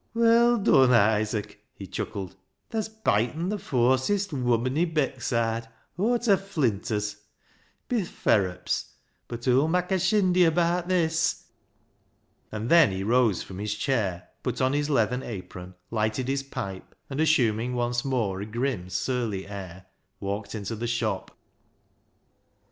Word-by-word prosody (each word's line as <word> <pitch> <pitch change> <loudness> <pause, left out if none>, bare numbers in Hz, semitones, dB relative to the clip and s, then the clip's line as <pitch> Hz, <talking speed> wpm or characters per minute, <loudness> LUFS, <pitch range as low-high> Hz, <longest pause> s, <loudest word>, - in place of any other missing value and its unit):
" - - -45
Well 235 +1 +5
dun, 135 - +5
Isaac," 105 -1 +1
he 100 - -8
chuckled, 95 +1 -5 0.2
" - - -50
tha's 220 -2 -2
byetten 165 - 0
[beaten] 210 - -1
th' 205 - -7
fawsest 135 - +1
woman 125 -1 +1
i' - - +4
Beckside 120 -7 -1 0.3
aw 220 +7 +2
ta 225 -5 +3
flinters. 105 - -1 0.7
Bi 245 - 0
th' 180 - -5
ferrups! 95 -4 0 0.3
bud 120 0 -7
hoo'll 130 +4 +4
mak' 180 +3 0
a 190 - +2
shindy 185 -2 +3
abaat 170 +1 +1
this." 165 -3 0 1.0
And 110 +2 -4
then 165 -4 +7
he 95 0 -3
rose 115 -2 +2
from 95 0 -9
his 105 0 -2
chair, 105 -7 -1
put 125 -1 -3
on 130 +1 +2
his 145 +1 0
leathern 125 -2 +1
apron, 90 -5 -8 0.2
lighted 110 +3 -1
his 135 +1 0
pipe, 100 -8 -7
and 140 +2 -2
assuming 125 -6 +2
once 120 0 0
more 110 -8 -1
a - - -4
grim, 115 -5 -2
surly 110 -1 -2
air, 95 -2 -8 0.3
walked 100 +1 -4
into 110 +1 -4
the 120 +2 -3
shop. 120 0 -1
125 Hz, 145 wpm, -26 LUFS, 105-160 Hz, 1.0 s, then